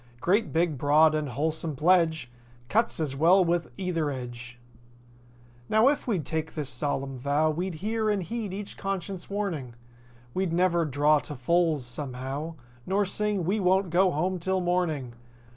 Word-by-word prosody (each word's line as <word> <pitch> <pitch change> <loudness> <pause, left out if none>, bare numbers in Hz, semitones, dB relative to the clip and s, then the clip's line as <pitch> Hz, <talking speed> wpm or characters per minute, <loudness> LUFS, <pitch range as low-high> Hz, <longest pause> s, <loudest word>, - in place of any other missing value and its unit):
Great 200 - +1
big, 160 -4 +1
broad 155 +3 +5
and 155 -2 -1
wholesome 155 +4 -2
pledge! 160 -4 +2 0.4
"Cuts 225 -3 +1
as 145 -4 -2
well 175 +6 +5
with 170 -1 0
either 175 -5 -1
edge." 120 -2 -7 1.1
Now, 220 +5 +5
if 290 - -2
we'd 190 - 0
take 160 +1 -3
this 150 -4 -2
solemn 135 0 -2
vow 145 +4 +2
We'd 175 +3 -3
hear 220 0 0
and 205 -3 0
heed 215 +2 -4
each 200 +1 -6
conscience 195 -2 -4
warning. 175 - -3 0.6
We'd 185 -3 -1
never 175 -1 +2
"draw 150 +1 +3
to 145 - -7
fulls," 155 +1 +1
somehow. 135 +5 -5 0.3
Nor 200 +2 +2
sing 205 -1 -1
"We 200 +5 +1
won't 190 -1 +2
go 185 +2 +4
home 180 +3 -1
'till 190 +2 0
morning." 175 -8 -1
165 Hz, 155 wpm, -27 LUFS, 145-190 Hz, 1.1 s, broad